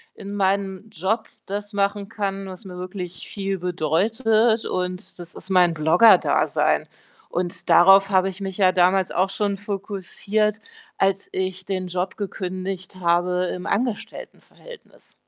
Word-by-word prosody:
in 200 +1 -7
meinem 195 +1 -1
Job 210 +6 -2 0.2
das 205 +1 -5
machen 200 0 -1
kann, 195 -3 -3
was 185 +3 -10
mir 180 -1 -9
wirklich 180 -1 -6
viel 195 -1 -3
bedeutet 215 - +1
und 180 0 -3
das 175 -1 -9
ist 185 - -9
mein 180 -2 +4
Blogger-Dasein. 165 +8 +4 0.4
Und 175 -1 -4
darauf 195 +2 +7
habe 190 -1 +3
ich 190 +1 -6
mich 190 -1 -4
ja 190 -3 +5
damals 185 +1 +3
auch 185 +2 +1
schon 200 0 -1
fokussiert, 205 +1 -2 0.4
als 195 0 0
ich 185 0 -3
den 185 -1 -3
Job 180 +1 -3
gekündigt 185 -1 -5
habe 175 +1 +2
im 180 - -6
Angestelltenverhältnis. 250 - -6
190 Hz, 135 wpm, -23 LUFS, 180-200 Hz, 0.4 s, darauf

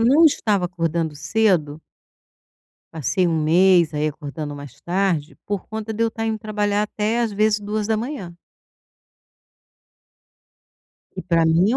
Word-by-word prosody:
não 275 +8 +5
estava 210 - +2
acordando 165 -3 -2
cedo 160 -5 +1 1.1
passei 165 +4 0
um 160 -2 0
mês 175 0 +4
aí 150 +1 +1
acordando 150 0 -6
mais 145 -3 -11
tarde, 175 -4 -1
por 205 -2 -3
conta 220 0 -5
de 230 - -1
eu 230 - +3
estar 225 0 -4
indo 220 -1 -1
trabalhar 210 -1 0
até 215 +2 -1
às 230 -3 0
vezes 215 +1 +2
2h00. 215 - -3 2.8
E - - -4
para 170 -2 +2
mim 170 +7 +3
é - - +2
190 Hz, 135 wpm, -22 LUFS, 160-215 Hz, 2.8 s, não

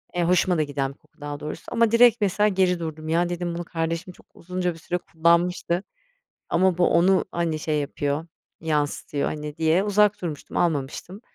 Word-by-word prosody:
Eee, 175 - +1
hoşuma 180 0 +3
da 155 - +2
giden 140 -2 -3
bir - - -27
koku 150 - -30
daha 145 0 -5
doğrusu. 150 - -6
Ama 230 -2 +3
direkt 235 -1 +5
mesela 205 +1 +2
geri 185 -3 +2
durdum. 155 -1 -6
"Ya" 175 +2 +2
dedim, 175 -1 -3
"...bunu 175 - -4
kardeşim 165 +2 -3
çok - - -21
uzunca 180 0 -3
bir 165 - -14
süre 175 +2 -2
kullanmıştı. 170 +2 +1 0.7
Ama 185 0 +2
bu 180 - +4
onu, 185 +3 +4
hani, 165 -2 -1
şey 150 -1 -1
yapıyor, 145 +2 -2 0.3
yansıtıyor." 145 -2 -1
hani, 150 0 -6
diye 165 +4 +3
uzak 210 0 +3
durmuştum, 155 -5 -5
almamıştım. 170 - -2
170 Hz, 180 wpm, -24 LUFS, 155-185 Hz, 0.7 s, direkt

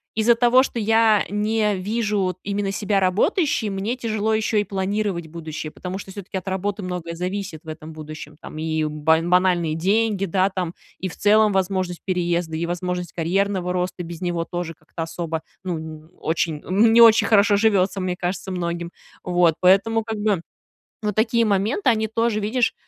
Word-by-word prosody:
из-за 225 +2 +4
того, 245 +2 +5
что 240 - -3
я 220 -1 +4
не 210 0 +1
вижу, 210 +2 -1
вот, 185 -1 -1
именно 200 0 -2
себя 200 0 0
работающей, 220 - +1
мне 200 +5 -2
тяжело 220 -3 -1
еще 215 0 +1
и - - +2
планировать 195 -3 -2
будущее, 155 -1 -6
потому 185 +1 -6
что 195 - -10
всё-таки 195 -1 -6
от 185 - -7
работы 200 +2 -2
многое 180 -2 -4
зависит 180 -1 -4
в 160 - -20
этом 155 0 -8
будущем. 155 -1 -9
Там - - -9
и 160 0 -1
бан 160 +3 +1
банальные 180 -3 +3
деньги, 200 +3 +1
да, 190 +1 +2
там, 180 -3 -3 0.3
и 185 - -2
в 165 - -8
целом 210 +1 +4
возможность 185 -2 -1
переезда, 175 -3 -1
и 165 - -1
возможность 180 +1 -3
карьерного 180 +2 0
роста 180 0 -2
без 170 0 -8
него 175 -2 -1
тоже 175 -1 -4
как-то 155 +2 -7
особо, 165 -1 -4 0.2
ну, 180 -3 -2
н 155 0 -9
очень 160 -2 -1
н 220 +5 +4
не 235 - +7
очень 225 -1 +7
хорошо 205 -1 +5
живётся, 200 -3 +2
мне 185 -1 -1
кажется, 180 +1 -3
многим. 170 -1 -3 0.3
Вот. 175 -2 +3
Поэтому, 195 +5 +4
как 220 0 -4
бы, 205 -4 +1 0.6
вот 210 -1 -1
такие 230 +2 +2
моменты, 215 - +1
они 220 -1 +1
тоже, 225 0 0
видишь 225 +3 0
190 Hz, 180 wpm, -22 LUFS, 170-210 Hz, 0.6 s, не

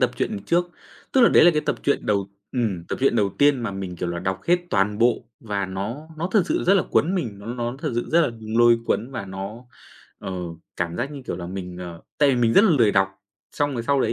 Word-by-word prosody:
tập - - +3
truyện - - -2
trước, 175 +1 +1 0.4
tức 265 - +4
là, 235 - +7
đấy - - +6
là 175 - +8
cái 150 -2 0
tập - - -1
truyện 140 - 0
đầu 100 -2 +1 0.2
ừm, 110 -10 -1
tập - - -2
truyện 135 -3 +3
đầu 100 -3 +2
tiên 145 -3 +4
mà 110 - -2
mình, 95 -2 -6
kiểu 90 - -3
là, 85 0 -3
đọc 95 +1 -2
hết 175 +1 +5
toàn 105 +2 +1
bộ 120 0 +2 0.2
và 100 -3 -2
nó 105 +11 -5
nó 170 +3 -2
thật 210 -5 +5
sự - - 0
rất 195 +3 +5
là 190 - +4
cuốn 175 +5 +2
mình. 115 - -3
Nó 100 - -11
nó 120 +1 -3
thật 130 - -3
sự 120 - -1
rất 170 +2 +5
là 125 - +2 0.3
lôi 120 0 +6
cuốn 120 +5 -1
và 125 -6 -5
nó, 100 +5 -7 0.5
ờ, 95 - -6 0.4
cảm 85 0 -2
giác 140 - -2
như, 140 - -8
kiểu - - -3
là, 85 - -6
mình, 90 -1 -6
ờ 85 -2 -8 0.2
tại 145 - +5
vì 130 - +1
mình 115 -2 +2
rất 200 - +7
là 215 - +4
lười 115 -9 +4
đọc. 95 0 +3 0.4
Xong 145 -1 0
rồi 115 - -2
sau 140 +3 +1
đấy 115 - +1
115 Hz, 265 wpm, -23 LUFS, 95-145 Hz, 0.5 s, là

